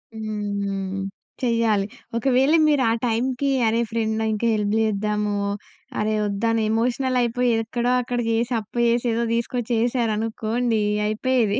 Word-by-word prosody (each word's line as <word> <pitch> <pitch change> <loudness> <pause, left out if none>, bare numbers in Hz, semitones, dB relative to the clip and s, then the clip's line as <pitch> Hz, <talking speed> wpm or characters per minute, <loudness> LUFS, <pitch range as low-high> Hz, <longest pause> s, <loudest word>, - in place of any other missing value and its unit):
హ్మ్. 200 -3 -3 0.4
చెయ్యాలి. 230 -4 +2 0.3
ఒకవేళ 265 +4 +3
మీరు 290 -3 +3
ఆ - - +3
టైమ్‌కి 250 +4 0 0.2
అరే 225 +1 +2
ఫ్రెండ్ 220 -1 0
ఇంక 215 +1 -3
హెల్ప్ 210 -1 0
చేద్దాము, 210 -1 0 0.6
అరె 215 +1 +1
వద్దనే 220 +2 0
ఎమోషనలయిపోయి 245 +1 +1
ఎక్కడో 240 +2 -1
అక్కడ 245 0 -3
చేసి 235 +2 0
అప్పు 215 +3 -12
చేసి 235 +1 +1
ఏదో 235 - 0
తీసుకొచేసారనుకోండి 230 -1 0 0.2
అయిపోయేది. 220 -1 +1
225 Hz, 115 wpm, -23 LUFS, 215-245 Hz, 0.6 s, ఒకవేళ